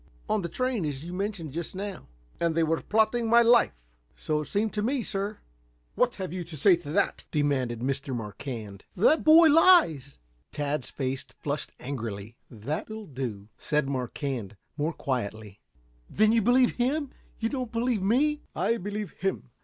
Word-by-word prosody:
"On 215 - +1
the 170 - -4
train, 255 -3 -1
as 145 -1 -4
you 175 - -6
mentioned 190 -5 -3
just 170 +3 -5
now." 195 -2 -6 0.3
"And 170 -1 +1
they 165 - +3
were 160 0 0
plotting 220 +2 +1
my 235 +1 +7
life?" 235 - +5 0.4
"So 150 -1 -1
it 150 - -7
seemed 215 +1 -1
to 210 - -1
me, 250 +3 0
sir." 200 +2 -3 0.6
"What 250 -1 +1
have 185 -3 -5
you 185 -1 -3
to 165 -2 -9
say 180 +6 +6
to 170 -4 -10
that?" 200 - 0
demanded 135 -6 0
Mr. 135 +1 -2
Marquand. 105 -2 -7
"That 260 - +5
the - - -8
boy 320 +1 +8
lies!" 290 - +5 0.3
Tad's 145 -2 -2
face 135 -1 -3
flushed 145 0 -3
angrily. 115 -5 -5
"That'll 155 - -5
do," 120 - -6
said 150 -3 0
Marquand, 125 -5 -4 0.2
more 155 +3 -1
quietly. 110 -8 -4 0.5
"Then 215 +1 +3
you 230 0 +3
believe 245 +3 +3
him 270 +3 0 0.3
you 225 - -1
do 270 - -3
not 250 -3 -4
believe 230 -2 0
me?" 290 +9 +2
"I 230 - +1
believe 205 -1 -4
him. 190 -9 -3
170 Hz, 170 wpm, -27 LUFS, 135-225 Hz, 0.6 s, boy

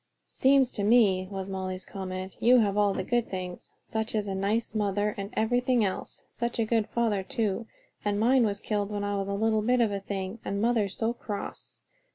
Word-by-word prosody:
"Seems 265 -1 +3
to 205 - -3
me," 200 -4 +4
was 195 -1 -5
Molly's 190 -1 -4
comment, 185 -1 -6
"you 250 +2 +6
have 205 -4 +3
all 205 -1 +3
the 190 - -2
good 240 +4 0
things: 180 -2 -6
such 220 0 -3
a 205 -2 -1
nice 205 +4 0
mother 205 -1 0
and 200 0 -5
everything 245 +1 +2
else. 190 - -4
Such 240 0 -3
a 230 - +2
good 220 -1 +1
father 225 -4 +1
too, 215 +2 -2 0.4
and 205 -1 0
mine 250 +3 +4
was 205 -2 0
killed 205 -1 -1
when 205 -1 -3
I 205 0 -1
was 195 -1 -2
a 200 - -1
little 220 +1 +2
bit 250 +3 +2
of 225 -3 +3
a 200 - -2
thing; 195 +2 -4
and 200 - -2
mother's 220 -3 +1
so 225 +1 0
cross. 210 -4 -7
205 Hz, 200 wpm, -28 LUFS, 195-230 Hz, 0.4 s, you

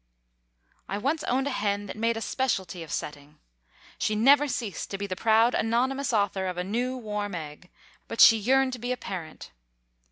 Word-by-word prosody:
I 200 - -2
once 280 +9 -1
owned 265 +2 0
a 285 - -1
hen 205 -4 -1
that 190 - -7
made 230 +1 0
a - - -4
specialty 190 -10 -2
of 160 -2 -9
setting. 145 0 -6 0.6
She 215 - 0
never 280 +7 +5
ceased 230 -7 -4
to 195 - -4
be 200 - -4
the 185 -2 -4
proud 225 +4 +3
anonymous 255 +5 0
author 200 -3 0
of 180 -1 -4
a 180 - -1
new, 245 +7 -2
warm 210 -4 -4
egg, 155 +2 -8 0.4
but 230 - -7
she 225 - +9
yearned 260 +4 +2
to 250 - -6
be 245 +2 -3
a 250 - -1
parent. 175 - -7
220 Hz, 190 wpm, -27 LUFS, 190-250 Hz, 0.6 s, she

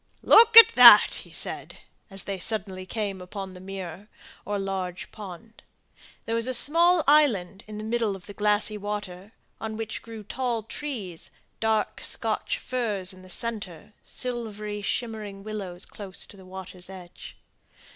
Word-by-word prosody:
"Look 455 0 +7
at 460 - +13
that!" - - +9
he - - -17
said, - - -6 0.3
as 195 -1 -3
they 195 -1 -5
suddenly 190 -2 -1
came 200 -2 -4
upon 190 +1 -7
the 180 - -11
mere, 190 0 -8 0.4
or 205 0 -2
large 190 -2 -4
pond. 215 +2 -11 0.6
There 225 - -3
was 230 +1 0
a 255 - +4
small 335 +5 +4
island 225 -11 +3
in 215 0 -8
the 215 - -6
middle 225 -2 -1
of 185 - -13
the 205 - -10
glassy 210 +1 0
water, 205 -1 -6 0.3
on 220 -1 -5
which 220 0 -4
grew 225 -2 -10
tall 240 0 -3
trees, 220 - -6 0.3
dark 220 -1 -1
Scotch - - -1
firs 210 -7 -3
in 185 - -15
the 185 - -15
centre, 205 -3 -4
silvery 215 -4 -4
shimmering 210 -2 -4
willows 195 -4 -4
close 195 -3 -3
to - - -14
the 190 -1 -15
water's 185 -1 -8
edge. 180 -2 -11
205 Hz, 155 wpm, -26 LUFS, 190-225 Hz, 0.6 s, at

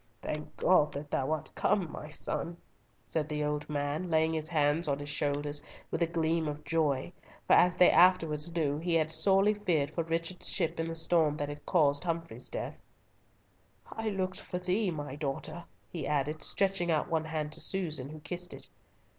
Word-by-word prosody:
"Thank 150 0 -5
God 165 -5 +4
that 145 +1 -6
thou 135 - 0
art 155 -2 -3
come, 185 -6 +1
my 150 - -7
son," 170 +2 -3 0.5
said 155 -1 -1
the 150 -1 -1
old 150 0 -2
man, 150 +4 -2
laying 160 0 +3
his 155 0 -2
hands 155 0 +2
on 140 -1 +1
his 145 0 -6
shoulders, 145 0 -1 0.3
with - - -2
a 170 - +4
gleam 165 -1 0
of 150 0 -5
joy, 150 0 0 0.3
for - - +4
as 180 0 +6
they 180 - +7
afterwards 170 -4 +4
knew, 150 -3 0
he 170 +1 0
had 155 -1 +2
sorely 195 +5 +4
feared 165 -9 0
for 165 - -1
Richard's 165 +2 -2
ship 165 -3 -1
in 165 - 0
the 165 - -4
storm 160 -2 +2
that 145 -1 -2
had 145 0 -8
caused 145 -5 +3
Humfrey's 165 -1 -4
death. - - -5 1.1
"I 225 0 -2
looked 185 -2 -2
for 180 - -4
thee, 185 +3 0
my 145 -5 -4
daughter," 150 +4 -4 0.2
he 165 -5 -5
added, 150 +1 0
stretching 195 -3 +1
out 155 -2 +2
one 160 -2 0
hand 155 -1 -3
to 165 - -5
Susan, 155 -8 -1
who 155 0 -9
kissed 175 +4 -5
it. - - -7
160 Hz, 190 wpm, -31 LUFS, 150-175 Hz, 1.1 s, they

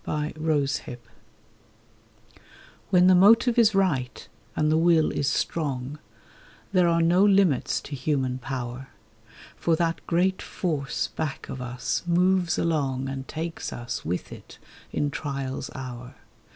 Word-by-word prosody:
LIMITLESS 150 -1 -1 2.1
WHEN 180 -2 +5
the 185 - +7
motive 230 +6 +5
is 220 -3 +5
right 150 -11 0 0.3
and 150 0 +1
the 160 - +3
will 165 -2 +4
is 140 - -1
strong 145 -3 -2 0.7
There 180 -3 +4
are 170 0 +3
no 175 +3 +4
limits 195 -9 +3
to 145 - -7
human 130 -2 -1
power; 125 0 -5 0.7
For 165 - +1
that 165 0 -1
great 185 +3 +1
Force 150 -7 -2
back 155 -3 -5
of 130 - -6
us 125 0 -2
moves 180 0 +2
along 135 -5 0
And 135 -1 -6
takes 160 +1 -5
us 120 0 -5
with 90 +3 -3
it, - - -12 0.3
in 145 -1 -1
trial's 140 -3 -4
hour. 125 -1 -8
155 Hz, 125 wpm, -26 LUFS, 135-175 Hz, 2.1 s, the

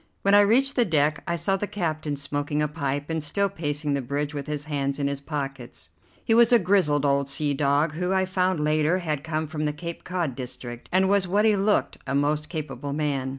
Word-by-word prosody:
When 200 - +3
I 205 - +8
reached 255 +7 +3
the 245 - +4
deck 150 -6 +1
I 170 - 0
saw 195 +3 +1
the 205 - -3
captain 155 -7 -2
smoking 145 +1 -3
a - - +1
pipe 145 -1 -3
and 160 -1 -1
still 200 +7 0
pacing 145 -3 -2
the 140 - 0
bridge 145 +4 -3
with 140 -1 -5
his 150 -1 -3
hands 140 -2 -2
in 140 - -1
his 140 0 -2
pockets. 140 -4 -5 0.3
He 225 - +3
was 235 +1 +6
a 240 - +8
grizzled 175 -8 +2
old 140 0 +1
sea 145 +1 0
dog, 145 +2 +2
who, 180 +3 -2
I 190 0 +2
found 185 -2 0
later, 155 +3 +2
had 155 -6 -3
come 160 -1 -2
from 155 0 -3
the 150 - 0
Cape 170 +2 -7
Cod 175 -6 -2
district, 125 -2 -8
and 190 +1 +4
was 200 -1 +2
what 205 +4 +2
he 215 -1 +5
looked, 200 +1 +1
a 135 - -1
most 150 +2 0
capable 145 -3 -5
man. 140 -3 -1
150 Hz, 225 wpm, -25 LUFS, 145-185 Hz, 0.3 s, I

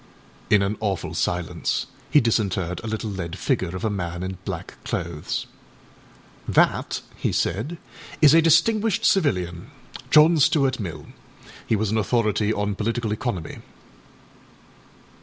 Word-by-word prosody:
â - - +6
In 100 - +4
an 100 +2 -1
awful 100 -4 -2
silence 90 -2 -1 0.2
he 150 - +6
disinterred 95 -7 0
a - - -5
little 110 0 -3
lead 90 -2 -5
figure 90 0 -1
of 95 - -4
a - - +2
man 85 -3 -4
in 95 -1 -5
black - - -7
clothes. 80 -2 -3 1.0
âThat,â - - +2 0.2
he - - -1
said, 140 - -1 0.4
âis 150 -2 +7
a 165 - +7
distinguished 205 +6 +3
civilian, 90 - +1 0.4
John 155 +2 +6
Stuart 135 -2 +3
Mill. 90 -6 -6 0.6
He 110 - +2
was 105 -1 -1
an 110 - +1
authority 110 -1 +1
on 105 -1 -1
political 115 +2 -2
economy. 105 -6 -3
105 Hz, 135 wpm, -23 LUFS, 95-130 Hz, 1.0 s, âis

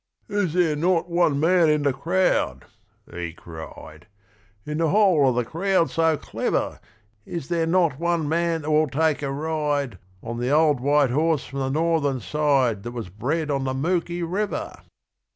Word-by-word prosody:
'Is 200 -6 -1
there 170 -4 +2
not 170 +2 0
one 170 -5 +2
man 170 +1 +4
in 150 -1 +2
the 140 -2 +2
crowd,' 180 +7 0 0.5
he 85 -1 -5
cried, 80 -1 -11 0.6
'In 150 +1 -3
the 165 -1 +2
whole 185 -9 +4
of 125 - -1
the 125 -1 0
crowd 175 +4 0
so 160 -1 +2
clever, - - -2 0.4
Is 165 0 -6
there 165 -2 0
not 165 -5 +2
one 170 -2 0
man 165 0 0
that 155 - -2
will 155 +1 +3
take 155 +2 +1
a 140 -2 -2
ride 145 -6 -2 0.2
On 115 +1 -5
the 125 +1 -1
old 150 -1 +3
white 140 0 +2
horse 155 +2 +1
from 140 - -6
the 135 -1 -1
Northern 155 -2 +1
side 135 -5 +1
That 120 +3 -7
was 115 -6 -6
bred 145 - -2
on 135 -1 -1
the 130 0 -2
Mooki 175 +4 -1
River?' 195 +5 -3
150 Hz, 170 wpm, -24 LUFS, 135-170 Hz, 0.6 s, man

